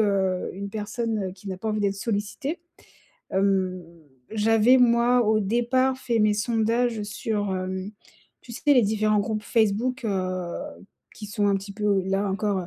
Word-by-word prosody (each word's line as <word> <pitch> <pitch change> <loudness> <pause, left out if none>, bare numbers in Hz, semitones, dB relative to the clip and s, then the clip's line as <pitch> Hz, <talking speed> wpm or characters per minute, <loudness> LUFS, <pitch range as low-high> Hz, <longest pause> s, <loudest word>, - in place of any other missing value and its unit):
heu, 190 -3 +1
une 200 +1 -6
personne, 215 0 -3
heu, - - -7
qui 195 +1 -11
n'a 185 - -4
pas 220 - -4
envie 215 0 -1
d'être 200 -1 +1
sollicitée. 230 - -3 0.7
Hem, 190 -2 +1 0.5
j'avais 225 +3 +4
moi, 240 0 +4
au 215 0 +3
départ, 245 +5 +1
fait 235 -3 -1
mes 210 -1 +3
sondages 225 +1 0
sur, 205 -1 -2
hem, 185 +2 -4 0.5
tu 235 - -11
sais, - - -8
les 250 - +6
différents 215 0 +2
groupes 215 0 -2
Facebook, 230 +3 0
heu, 185 -3 -2 0.6
qui 210 - -8
sont 205 0 -1
un 200 - +3
petit 200 +1 -7
peu, 205 -2 +1
là 195 +1 0
encore, 195 -2 -1
210 Hz, 160 wpm, -25 LUFS, 195-230 Hz, 0.7 s, les